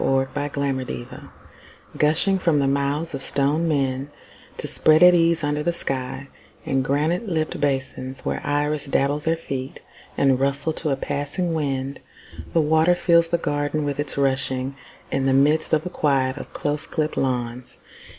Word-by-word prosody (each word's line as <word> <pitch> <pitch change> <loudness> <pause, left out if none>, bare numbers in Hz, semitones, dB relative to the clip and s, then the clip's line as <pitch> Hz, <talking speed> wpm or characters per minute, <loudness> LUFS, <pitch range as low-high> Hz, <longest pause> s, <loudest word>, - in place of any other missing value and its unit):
In - - +1
a 135 +2 0
Garden 130 - -4 0.7
Gushing 165 +6 +2
from 165 -4 +2
the 140 - +2
mouths 140 +4 0
of 135 - -4
stone 145 +5 +1
men 135 -2 0 0.5
To - - -4
spread 155 +2 +4
at 180 0 +9
ease 170 -2 +3
under 145 0 0
the 175 - +1
sky 135 -2 -4 0.4
In 135 -1 +1
granite 155 - 0
lipped 155 -3 -2
basins, 135 -2 -2
Where - - -2
iris 145 0 0
dabble 140 +1 +1
their 160 +2 0
feet 135 -4 -6 0.3
And 135 -2 +3
rustle 140 +3 0
to 155 - -2
a 135 - +2
passing 145 +6 -2
wind, 140 -3 -2 0.5
The 165 - +3
water 160 +3 +3
fills 170 -1 +3
the 170 - +1
garden 145 -1 -1
with 145 0 -3
its 145 -1 -2
rushing, 130 -1 0 0.4
In 135 0 0
the 135 - +3
midst 150 +4 +3
of 155 -1 +2
the 180 - -5
quiet 135 -4 +1
of - - -8
close 150 +1 -2
clipped 155 -2 -2
lawns. 125 -1 -2
145 Hz, 165 wpm, -23 LUFS, 135-155 Hz, 0.7 s, at